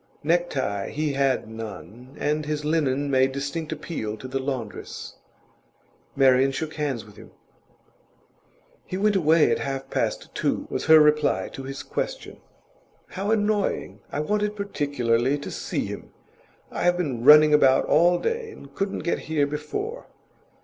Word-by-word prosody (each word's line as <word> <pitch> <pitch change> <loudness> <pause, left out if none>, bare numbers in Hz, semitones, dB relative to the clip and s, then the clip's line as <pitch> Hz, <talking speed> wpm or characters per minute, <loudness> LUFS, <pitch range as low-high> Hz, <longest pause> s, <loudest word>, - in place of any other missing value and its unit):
Necktie 150 - 0
he 150 -1 -2
had 135 -3 +1
none, 115 - -9
and 150 0 -1
his 150 -1 -2
linen 145 -3 0
made 130 0 +3
distinct 140 +4 -4
appeal 150 -9 -4
to 130 - -8
the 135 +1 -2
laundress. 130 -6 -6 1.0
Marian 135 0 +4
shook 155 +3 -4
hands 140 -7 -3
with 105 -2 -17
him. - - -13 1.5
'He 185 - -5
went 205 +1 +2
away 160 -3 +4
at - - +1
half 135 -1 -4
past - - -2
two,' - - -1
was - - -2
her 160 0 +8
reply 150 -1 +3
to 135 - -8
his 135 +1 -6
question. - - -5 0.7
'How 195 +2 -4
annoying! 210 -1 0
I 145 - -2
wanted 210 +5 -1
particularly 140 - 0
to 145 - -7
see - - -3
him. - - -7 0.6
I - - -4
have 175 0 +3
been 135 -10 -2
running 150 +2 +8
about 135 -3 +5
all 175 +2 +4
day, 460 - -2
and 140 - -13
couldn't 195 +4 -3
get 170 - 0
here 150 -3 +2
before. 150 - -5
150 Hz, 150 wpm, -25 LUFS, 135-170 Hz, 1.5 s, her